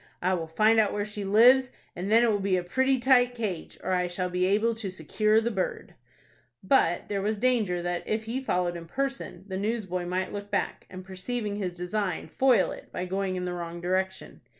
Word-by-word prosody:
"I 185 Hz, +1 st, +1 dB
will 165 Hz, -3 st, -2 dB
find 215 Hz, +7 st, +3 dB
out 210 Hz, -2 st, +2 dB
where 205 Hz, 0 st, -1 dB
she 210 Hz, -1 st, -6 dB
lives, 245 Hz, +6 st, +6 dB, 0.3 s
and 190 Hz, +4 st, -4 dB
then 230 Hz, +2 st, +6 dB
it 235 Hz, -, +4 dB
will 205 Hz, -, 0 dB
be 195 Hz, -1 st, +1 dB
a 180 Hz, -, -2 dB
pretty 265 Hz, +9 st, +1 dB
tight 245 Hz, -1 st, +4 dB
cage, 205 Hz, -8 st, -4 dB
or 185 Hz, -, -1 dB
I 180 Hz, -1 st, +1 dB
shall 180 Hz, +1 st, -3 dB
be 180 Hz, 0 st, +1 dB
able 215 Hz, +4 st, +2 dB
to 220 Hz, -3 st, -4 dB
secure 215 Hz, +5 st, +1 dB
the 230 Hz, +1 st, -1 dB
bird." 190 Hz, -4 st, -3 dB, 0.7 s
But 175 Hz, -11 st, +2 dB
there 200 Hz, -1 st, -2 dB
was 210 Hz, +2 st, -1 dB
danger 215 Hz, -7 st, +1 dB
that, 175 Hz, 0 st, -3 dB
if 220 Hz, +1 st, -1 dB
he 235 Hz, +4 st, -3 dB
followed 180 Hz, -8 st, 0 dB
in 170 Hz, -1 st, -8 dB
person, 270 Hz, -1 st, -4 dB
the 190 Hz, -1 st, -4 dB
newsboy 190 Hz, -4 st, -2 dB
might 185 Hz, +1 st, -2 dB
look 205 Hz, 0 st, -6 dB
back, 205 Hz, -, -2 dB
and, 185 Hz, 0 st, -9 dB
perceiving 205 Hz, +3 st, -4 dB
his 185 Hz, -4 st, -3 dB
design, 180 Hz, -1 st, -3 dB
foil 245 Hz, -, +3 dB
it -, -, -10 dB
by 180 Hz, -, -3 dB
going 190 Hz, 0 st, -2 dB
in 180 Hz, 0 st, -3 dB
the 180 Hz, -, -3 dB
wrong 170 Hz, -1 st, -5 dB
direction. 185 Hz, +2 st, -2 dB
195 Hz, 215 wpm, -27 LUFS, 180-225 Hz, 0.7 s, lives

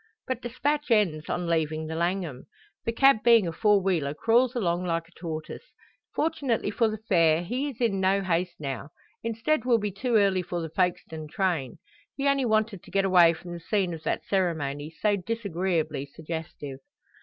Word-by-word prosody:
But 260 Hz, -2 st, -3 dB
despatch 285 Hz, +5 st, -1 dB
ends 180 Hz, -9 st, +2 dB
on 175 Hz, -, -1 dB
leaving 160 Hz, -2 st, 0 dB
the 160 Hz, -, -5 dB
Langham. 170 Hz, -5 st, -2 dB, 0.4 s
The 230 Hz, -, +1 dB
cab 270 Hz, +2 st, +5 dB
being 230 Hz, -5 st, +6 dB
a -, -, -1 dB
four 205 Hz, +5 st, +3 dB
wheeler 160 Hz, -7 st, 0 dB
crawls 240 Hz, -, +3 dB
along 175 Hz, -6 st, 0 dB
like 165 Hz, -2 st, -1 dB
a -, -, -23 dB
tortoise. 160 Hz, -, -7 dB, 0.4 s
Fortunately 280 Hz, -9 st, 0 dB
for 230 Hz, +2 st, +2 dB
the 215 Hz, 0 st, -3 dB
fare 170 Hz, -6 st, +3 dB
he 255 Hz, +10 st, -2 dB
is 255 Hz, -, -10 dB
in 225 Hz, -6 st, +1 dB
no 195 Hz, +1 st, +2 dB
haste 175 Hz, -1 st, 0 dB
now; 140 Hz, -1 st, -5 dB, 0.3 s
instead 230 Hz, +4 st, 0 dB
will 245 Hz, -2 st, +4 dB
be 210 Hz, -2 st, -2 dB
too 235 Hz, +5 st, -1 dB
early 195 Hz, -3 st, +4 dB
for 175 Hz, 0 st, -4 dB
the 165 Hz, -1 st, -4 dB
Folkestone 165 Hz, -4 st, -1 dB
train. 160 Hz, -, -1 dB, 0.4 s
He 275 Hz, 0 st, 0 dB
only 275 Hz, -2 st, +2 dB
wanted 215 Hz, -4 st, +1 dB
to -, -, -16 dB
get 195 Hz, 0 st, +1 dB
away 175 Hz, -3 st, +6 dB
from 175 Hz, +2 st, -10 dB
the 175 Hz, -, -6 dB
scene 185 Hz, 0 st, 0 dB
of 160 Hz, -, -7 dB
that -, -, -2 dB
ceremony, 155 Hz, -6 st, -1 dB
so 205 Hz, +6 st, 0 dB
disagreeably 185 Hz, -8 st, -2 dB
suggestive. 155 Hz, -2 st, -7 dB
185 Hz, 180 wpm, -27 LUFS, 165-225 Hz, 0.4 s, being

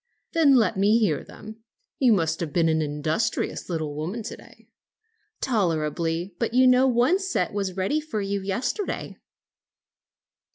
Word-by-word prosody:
"Then 305 Hz, -5 st, +5 dB
let 225 Hz, -5 st, +2 dB
me 205 Hz, +3 st, +4 dB
hear 195 Hz, -11 st, +1 dB
them. 220 Hz, +1 st, -12 dB, 0.4 s
You 255 Hz, -3 st, +4 dB
must 165 Hz, -4 st, 0 dB
have 165 Hz, -4 st, -3 dB
been 165 Hz, +1 st, +2 dB
an 160 Hz, 0 st, +1 dB
industrious 155 Hz, +8 st, -2 dB
little 155 Hz, -4 st, -3 dB
woman 175 Hz, +10 st, -4 dB
to 225 Hz, -, -6 dB
day." -, -, -18 dB, 0.7 s
"Tolerably; 170 Hz, -, -1 dB
but 230 Hz, 0 st, -1 dB
you 255 Hz, +1 st, +6 dB
know 255 Hz, +1 st, +5 dB
one 255 Hz, +9 st, +3 dB
set 385 Hz, -, -1 dB
was 195 Hz, -2 st, -3 dB
ready 195 Hz, +12 st, 0 dB
for 300 Hz, -8 st, -4 dB
you 200 Hz, 0 st, -2 dB
yesterday." 245 Hz, -, -3 dB
200 Hz, 150 wpm, -25 LUFS, 165-245 Hz, 0.7 s, you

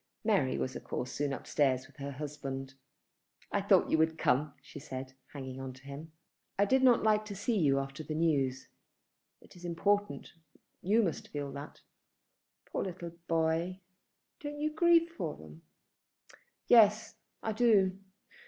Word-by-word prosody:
Mary 195 Hz, -, +2 dB
was 130 Hz, -, -2 dB
of -, -, -6 dB
course 125 Hz, 0 st, -4 dB
soon 145 Hz, +1 st, -1 dB
upstairs 135 Hz, -1 st, 0 dB
with 145 Hz, -, -20 dB
her 140 Hz, 0 st, -5 dB
husband. 135 Hz, -2 st, -5 dB, 0.8 s
"I -, -, +1 dB
thought -, -, +4 dB
you 160 Hz, -, +3 dB
would 160 Hz, 0 st, +2 dB
come," 140 Hz, +3 st, +1 dB
she 145 Hz, +1 st, -11 dB
said, 130 Hz, -2 st, -7 dB, 0.2 s
hanging 130 Hz, -2 st, -7 dB
on 130 Hz, -1 st, -6 dB
him. 140 Hz, +4 st, -10 dB, 0.5 s
"I 200 Hz, -, +4 dB
did 265 Hz, +6 st, +3 dB
not 250 Hz, -3 st, +5 dB
like 215 Hz, -1 st, +4 dB
not 215 Hz, -, -13 dB
to 200 Hz, -, -6 dB
see 230 Hz, +4 st, -1 dB
you 145 Hz, -8 st, +3 dB
after 135 Hz, +2 st, -4 dB
the 155 Hz, -, -4 dB
news. 140 Hz, -5 st, +1 dB, 0.7 s
It -, -, -18 dB
is 175 Hz, -, -14 dB
important. 175 Hz, -2 st, 0 dB, 0.5 s
You 215 Hz, +5 st, +3 dB
must 175 Hz, -, -2 dB
feel 145 Hz, -1 st, -5 dB
that." 140 Hz, +2 st, -9 dB, 0.8 s
"Poor -, -, -3 dB
little 175 Hz, -2 st, -6 dB, 0.2 s
boy! 165 Hz, +3 st, 0 dB, 0.6 s
Don't 295 Hz, 0 st, -6 dB
you 305 Hz, +1 st, -1 dB
grieve 335 Hz, +1 st, +5 dB
for 185 Hz, -, -5 dB
them." 80 Hz, +1 st, -13 dB, 1.1 s
"Yes, 220 Hz, -2 st, +5 dB, 0.3 s
I 220 Hz, -, -1 dB
do. 205 Hz, -4 st, +3 dB
160 Hz, 155 wpm, -32 LUFS, 135-205 Hz, 1.1 s, not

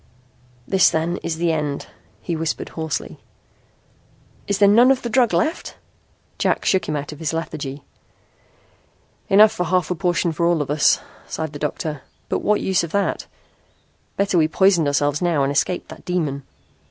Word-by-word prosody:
"This 190 Hz, -2 st, +4 dB
then 165 Hz, +2 st, -1 dB
is 160 Hz, -, -4 dB
the 170 Hz, 0 st, +1 dB
end," 150 Hz, -3 st, -2 dB, 0.4 s
he 170 Hz, -, -2 dB
whispered 160 Hz, 0 st, -3 dB
hoarsely. 160 Hz, -2 st, -5 dB, 1.3 s
"Is 200 Hz, -, 0 dB
there 200 Hz, -1 st, +5 dB
none 235 Hz, +5 st, +6 dB
of 270 Hz, -1 st, +2 dB
the 235 Hz, -, -3 dB
drug 245 Hz, -1 st, +3 dB
left?" 315 Hz, +2 st, -1 dB, 0.6 s
Jack -, -, 0 dB
shook 190 Hz, -4 st, +1 dB
him 155 Hz, -, -1 dB
out 145 Hz, 0 st, -4 dB
of 150 Hz, -, -10 dB
his 160 Hz, -1 st, -2 dB
lethargy. 150 Hz, -4 st, -5 dB, 1.5 s
"Enough 210 Hz, +2 st, +7 dB
for -, -, -5 dB
a -, -, +1 dB
half 180 Hz, -1 st, +1 dB
portion 175 Hz, -1 st, +1 dB
for 170 Hz, +2 st, 0 dB
all 170 Hz, -3 st, +2 dB
of 145 Hz, -, -6 dB
us," 150 Hz, 0 st, +3 dB, 0.3 s
sighed 160 Hz, -2 st, -4 dB
the 145 Hz, -, -7 dB
doctor. 150 Hz, 0 st, -3 dB, 0.3 s
"But -, -, 0 dB
what 210 Hz, 0 st, +1 dB
use 190 Hz, -2 st, +1 dB
of 170 Hz, -, -5 dB
that? 200 Hz, -1 st, -1 dB, 0.9 s
Better 195 Hz, -3 st, +2 dB
we 155 Hz, -, +3 dB
poisoned 175 Hz, -2 st, +3 dB
ourselves 145 Hz, +1 st, +1 dB
now 170 Hz, -5 st, +1 dB
and 135 Hz, -, 0 dB
escaped 175 Hz, +5 st, -1 dB
that -, -, -11 dB
demon." 150 Hz, -7 st, -2 dB
165 Hz, 170 wpm, -21 LUFS, 150-190 Hz, 1.5 s, Enough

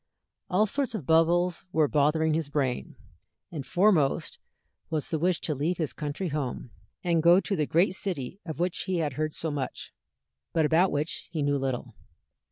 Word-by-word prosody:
All 195 Hz, +4 st, +3 dB
sorts 250 Hz, +2 st, -1 dB
of 180 Hz, -11 st, -5 dB
bubbles 170 Hz, +2 st, +3 dB
were 155 Hz, -3 st, +3 dB
bothering 155 Hz, +2 st, +2 dB
his 155 Hz, -2 st, -1 dB
brain, 135 Hz, -4 st, -2 dB, 0.6 s
and 155 Hz, -5 st, -5 dB
foremost 175 Hz, -2 st, +2 dB, 0.5 s
was 155 Hz, -3 st, -1 dB
the 160 Hz, -, 0 dB
wish 175 Hz, +1 st, +1 dB
to 155 Hz, -, -1 dB
leave 155 Hz, +6 st, -1 dB
his 160 Hz, -4 st, -2 dB
country 150 Hz, +5 st, -3 dB
home, 135 Hz, -5 st, -4 dB, 0.3 s
and 170 Hz, -2 st, +2 dB
go 170 Hz, +3 st, +7 dB
to 195 Hz, -, -2 dB
the 150 Hz, -5 st, 0 dB
great 175 Hz, +3 st, +3 dB
city 180 Hz, -4 st, -4 dB
of 160 Hz, -3 st, -6 dB
which 175 Hz, 0 st, -1 dB
he 185 Hz, -1 st, -1 dB
had 150 Hz, -4 st, -1 dB
heard 155 Hz, +2 st, -2 dB
so 160 Hz, -, -2 dB
much, 140 Hz, -3 st, -4 dB, 0.6 s
but 160 Hz, -2 st, +3 dB
about 165 Hz, +5 st, +3 dB
which 150 Hz, +3 st, -3 dB
he 155 Hz, -3 st, -1 dB
knew 145 Hz, 0 st, +1 dB
little. 130 Hz, -2 st, -3 dB
160 Hz, 175 wpm, -28 LUFS, 145-175 Hz, 0.6 s, go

